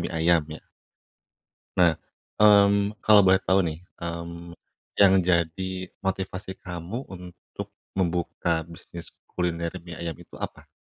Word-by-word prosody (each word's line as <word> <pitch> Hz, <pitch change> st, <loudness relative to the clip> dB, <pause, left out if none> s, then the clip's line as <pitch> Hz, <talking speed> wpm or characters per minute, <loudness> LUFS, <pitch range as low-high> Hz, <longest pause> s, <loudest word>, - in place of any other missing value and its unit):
mie -, -, -3 dB
ayam 80 Hz, 0 st, +3 dB
ya. 80 Hz, 0 st, -9 dB, 1.1 s
Nah, 85 Hz, -2 st, +5 dB, 0.5 s
mmm, 100 Hz, 0 st, +5 dB
kalau 105 Hz, -1 st, +8 dB
boleh 95 Hz, +1 st, +5 dB
tahu 95 Hz, +1 st, +4 dB
nih, 80 Hz, -1 st, -4 dB, 0.2 s
mmm, 85 Hz, 0 st, -6 dB, 0.4 s
yang 95 Hz, -1 st, +7 dB
jadi 85 Hz, 0 st, +1 dB, 0.3 s
motivasi 95 Hz, 0 st, -3 dB
kamu 90 Hz, +8 st, -5 dB
untuk 90 Hz, -2 st, -9 dB, 0.3 s
membuka 85 Hz, -2 st, 0 dB
bisnis 85 Hz, +1 st, -11 dB, 0.2 s
kuliner 85 Hz, -2 st, -1 dB
mie 85 Hz, -2 st, -9 dB
ayam 85 Hz, -2 st, -4 dB
itu -, -, -15 dB
apa? -, -, -7 dB
85 Hz, 120 wpm, -26 LUFS, 85-95 Hz, 1.1 s, kalau